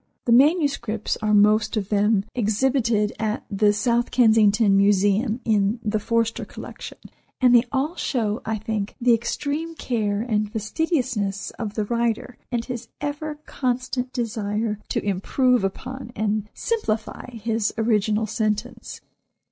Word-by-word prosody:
The 235 - +1
manuscripts 270 - +2
are 215 -1 -1
most 210 +2 +4
of 200 -2 -2
them, 205 -1 +2
exhibited 225 -1 +1
at 215 -1 -1
the 205 +1 +3
South 235 +3 +1
Kensington 220 -3 +4
Museum 205 +4 +2
in 215 0 +2
"the 215 0 0
Forster 230 +1 0
Collection," - - -9 0.4
and 250 -2 +5
they 240 0 +6
all 290 +5 -1
show 220 -4 -1
I 220 0 -2
think, 215 -1 -3
the 240 0 +4
extreme 290 +8 -2
care 215 -7 -1
and 215 -3 -1
fastidiousness 220 - -1
of 215 -3 -4
the 215 - -1
writer, 235 +2 -1
and 235 -1 -1
his 245 -2 -6
ever 295 +1 -4
constant 250 0 -2
desire 215 -3 -2
to - - -2
improve 240 +5 +2
upon 255 +6 -5
and 210 0 -1
simplify 230 - -2
his 225 -1 -1
original 215 -1 +1
sentence. 215 +1 -3
225 Hz, 130 wpm, -23 LUFS, 210-245 Hz, 0.4 s, they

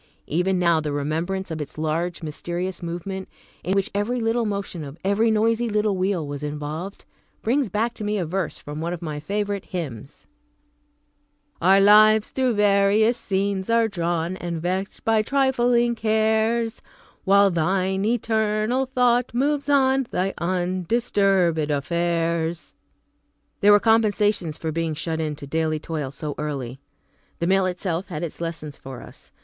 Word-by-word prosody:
Even 180 +4 0
now, 170 -2 +3
the 150 -1 -3
remembrance 165 +6 -2
of 160 -1 -3
its 150 - -8
large, 165 +3 -2
mysterious 175 +4 -4
movement, 180 +3 -5 0.3
in 185 - 0
which 195 +3 0
every 210 +5 -1
little 225 0 0
motion 200 -5 -4
of 140 +1 -9
every 205 +4 +3
noisy 225 +2 +2
little 210 -1 +1
wheel 185 -3 0
was 145 0 -5
involved, 150 +6 -5 0.4
brings 255 +1 +1
back 220 +5 -1
to 220 - -8
me 210 0 -1
a 180 - -1
verse 180 +1 -2
from 150 +1 -7
one 170 +2 -2
of 175 0 -7
my 150 -2 -4
favorite 200 +4 -2
hymns: 140 -7 -7 1.4
"Our 190 +3 +6
lives 215 +1 +6
through 255 -3 +1
various 205 +3 +4
scenes 195 -2 -2
are 230 0 +3
drawn, 175 -2 -2
And 170 -2 -4
vexed 185 +3 -3
by 225 -1 +3
trifling 245 -2 +2
cares, 220 +1 +1 0.4
While 200 0 +5
Thine 190 +3 0
eternal 220 +2 +1
thought 250 -1 +2
moves 285 +3 0
on 270 -2 +3
Thy 190 +2 -1
undisturbed 185 -1 +1
affairs." 170 +2 -1 0.9
There 205 0 +6
were 205 - +7
compensations 210 -7 +2
for 160 - -3
being 165 0 -2
shut 160 0 -3
in 155 -1 -2
to 145 - -9
daily 155 +2 0
toil 155 -3 -4
so 145 +2 -5
early. 135 -4 -4 0.6
The 170 - -2
mill 190 +1 +3
itself 180 0 -3
had 165 -3 -5
its 170 0 -6
lessons 160 -3 -5
for 130 -2 -9
us. - - -15
190 Hz, 150 wpm, -23 LUFS, 165-215 Hz, 1.4 s, were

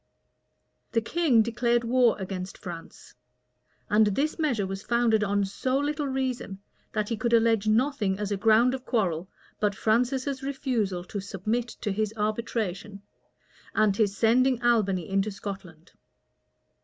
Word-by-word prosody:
The 230 - +3
king 260 -3 +3
declared 235 +1 +1
war 240 0 +3
against 190 -1 -5
France; 170 -3 -10 0.7
and 215 +1 +4
this 280 - -1
measure 250 -11 +1
was 195 0 -5
founded 230 -1 +2
on 200 -1 +1
so 255 +7 -1
little 290 +1 -1
reason, 260 -7 -3 0.3
that 215 -1 -2
he 230 - 0
could 235 +2 -1
allege 225 -2 +3
nothing 220 -4 +1
as 210 0 -3
a - - +1
ground 225 +4 +4
of 260 -1 -5
quarrel, 185 -8 -1 0.3
but 205 -2 +1
Francis's 255 +6 0
refusal 245 -9 -2
to 200 +3 -5
submit 210 +5 -2
to 210 - -1
his 215 +2 -2
arbitration, 210 -2 -3 0.7
and 215 -2 +3
his 205 -2 +1
sending 250 +2 +3
Albany 200 -8 +2
into 195 +2 0
Scotland. 190 -5 -8
220 Hz, 140 wpm, -27 LUFS, 200-245 Hz, 0.7 s, and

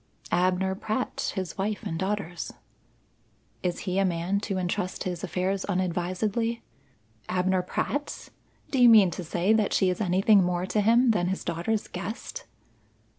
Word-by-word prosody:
"Abner 185 +2 +2
Pratt, 215 +6 -2
his 185 -2 -4
wife, 210 +3 -2
and 165 -6 -3
daughters." 190 -4 -3 1.1
"Is 175 -1 -2
he 185 -1 -1
a - - +3
man 180 +2 0
to 200 -2 -3
entrust 185 +1 -2
his 180 -2 -4
affairs 190 +1 -1
unadvisedly?" 185 +5 -1 0.7
"Abner 185 0 +1
Pratt! 285 +10 -3 0.4
Do 265 - +2
you 245 - +9
mean 210 -6 +7
to 180 - -5
say 175 +5 +1
that 215 -2 +2
she 185 -1 +3
is 180 - -4
anything 195 +1 +4
more 180 0 0
to 210 +3 0
him 235 +3 +5
than 180 -5 +1
his 190 +1 -2
daughters' 175 +6 -2
guest?" 220 - -6
190 Hz, 150 wpm, -27 LUFS, 180-210 Hz, 1.1 s, you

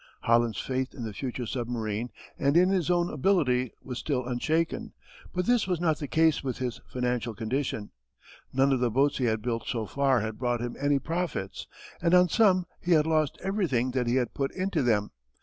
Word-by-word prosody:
Holland's 115 -2 +2
faith 130 0 -2
in 120 - -6
the 110 -2 -5
future 125 +2 -4
submarine 115 -2 -3 0.3
and 140 +3 +3
in 180 +1 +5
his 185 -3 +1
own 175 -1 +2
ability 130 - +2
was 125 -2 -5
still 130 -5 -1
unshaken, 155 +7 -1 0.4
but 180 0 -1
this 245 -5 +2
was 180 -3 0
not 160 -3 +1
the 145 - -4
case 160 -1 +3
with 130 -2 -3
his 125 -2 -4
financial 125 -2 -2
condition. 110 -1 -2 0.6
None 135 +1 +3
of 130 - +1
the 125 -1 +2
boats 140 +5 +2
he 130 - +1
had 110 -2 0
built 115 -1 -2
so 115 -3 -2
far 135 -1 +2
had 110 0 -4
brought 120 -1 0
him 120 0 -4
any 145 0 +2
profits 160 - -3 0.3
and 175 0 +4
on 180 0 +6
some 185 -3 +4 0.2
he 175 - +2
had 155 -2 +4
lost 155 -3 +1
everything 175 - 0
that 125 -1 -1
he 120 - +2
had 125 -2 0
put 135 -1 -1
into 185 -4 0
them. 110 -5 +1
130 Hz, 200 wpm, -28 LUFS, 120-160 Hz, 0.6 s, on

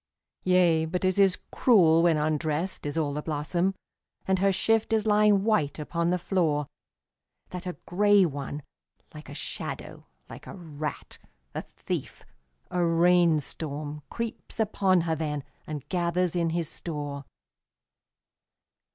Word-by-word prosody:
Yea, 180 -3 +4
but 180 +3 -2
it 185 +1 +1
is 190 -2 +5
cruel 170 -9 +5
when 170 -2 +4
undressed 155 +3 -1
is 145 - -3
all 150 -3 0
the 150 - -3
blossom, 170 +5 -1 0.5
And 190 -1 +2
her 195 +1 +3
shift 225 +3 +1
is 220 -1 +2
lying 210 -2 +4
white 160 -10 +1
upon 170 +2 -1
the 180 - +2
floor, 165 -5 0 0.9
That 180 +1 -6
a 180 - -5
grey 205 +1 +4
one, 145 -1 -5 0.5
like - - -11
a - - -8
shadow, - - -6 0.2
like - - -11
a - - -8
rat, 155 -3 -6 0.3
a - - -3
thief, - - -6 0.5
a 180 -1 +1
rain 170 -1 +4
storm 150 0 -5
Creeps 230 0 -6
upon 195 -4 +2
her 165 -1 0
then 150 -2 -3 0.2
and 150 -3 -6
gathers 180 -1 0
in 170 -1 +1
his 165 -1 -1
store. 145 -4 -5
170 Hz, 140 wpm, -27 LUFS, 155-185 Hz, 0.9 s, is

